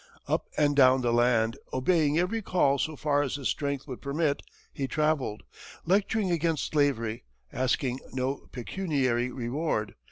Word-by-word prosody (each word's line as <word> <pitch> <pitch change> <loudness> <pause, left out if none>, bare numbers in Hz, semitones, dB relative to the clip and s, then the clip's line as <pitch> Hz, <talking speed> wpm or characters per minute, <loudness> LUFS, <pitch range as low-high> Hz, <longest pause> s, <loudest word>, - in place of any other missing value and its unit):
Up - - 0
and 145 -1 +3
down 130 -1 +6
the 120 -1 +1
land, 120 -1 +3
obeying 150 +2 +2
every 190 +6 0
call 140 -8 +2
so 155 +5 -1
far 145 0 +1
as 140 -2 -2
his 140 -3 -2
strength 140 -2 -2
would 130 -3 -7
permit, 145 +1 0 0.3
he 135 - -2
travelled, 150 -6 0 0.4
lecturing 200 +1 +1
against 165 -2 0
slavery, 120 -7 +1 0.3
asking 130 0 0
no 130 +1 -3
pecuniary 130 -4 -1
reward. 120 -2 -2
140 Hz, 140 wpm, -28 LUFS, 125-155 Hz, 0.4 s, down